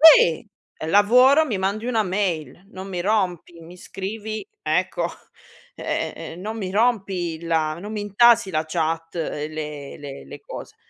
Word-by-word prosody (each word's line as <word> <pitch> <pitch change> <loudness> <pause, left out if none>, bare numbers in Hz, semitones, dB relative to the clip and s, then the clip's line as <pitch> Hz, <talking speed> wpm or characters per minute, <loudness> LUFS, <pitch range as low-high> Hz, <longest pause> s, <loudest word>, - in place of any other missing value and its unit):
Si! 240 - +8 0.3
È 155 - -5
lavoro, 250 - +6
mi 230 -10 -2
mandi 200 +4 -1
una 230 -3 +2
mail, 185 -3 -2
non 190 -1 -8
mi 180 -2 -3
rompi, 180 -4 -1
mi 170 +2 -12
scrivi 215 - -6 0.2
ecco, - - 0 0.7
e - - -2
e - - -8
e 165 - -9
non 215 +5 -5
mi 190 -4 -4
rompi 195 -7 0
la 160 -1 0
non 210 +2 -7
mi 215 - -3
intasi 205 0 +4
la 155 -2 0
chat 165 0 -2
e 155 -2 -3
le 150 -2 -6
le 140 -2 -8
le - - -10
cose, - - -9
190 Hz, 165 wpm, -23 LUFS, 165-215 Hz, 0.7 s, Si